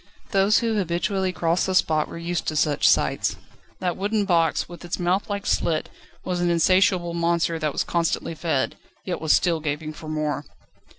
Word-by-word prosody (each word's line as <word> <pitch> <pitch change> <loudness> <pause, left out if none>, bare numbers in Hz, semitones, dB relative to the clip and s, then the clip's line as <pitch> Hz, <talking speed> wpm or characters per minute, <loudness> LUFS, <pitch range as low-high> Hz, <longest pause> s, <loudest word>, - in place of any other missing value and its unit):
Those 195 +1 +4
who 225 -2 0
habitually 185 +1 0
crossed 170 +1 0
this 190 -1 +2
spot 155 -3 +2
were - - -8
used 170 0 -3
to 155 - -1
such 150 -1 +3
sights. - - +1 0.4
That 180 -2 -2
wooden 205 +1 0
box, 170 -3 +2
with 175 0 -11
its 175 - -3
mouthlike 200 +3 -1
slit 160 -2 0 0.4
was 180 -1 -1
like 175 - +1
an - - +2
insatiable 180 0 +3
monster 170 -1 0
that 155 -1 0
was - - -1
constantly 170 -1 -1
fed, 160 -4 -1 0.3
yet 180 - -3
was 160 -1 +1
still 170 -3 +3
gaping 155 0 -3
for 155 - -10
more. 155 -1 -2
170 Hz, 180 wpm, -24 LUFS, 160-185 Hz, 0.4 s, Those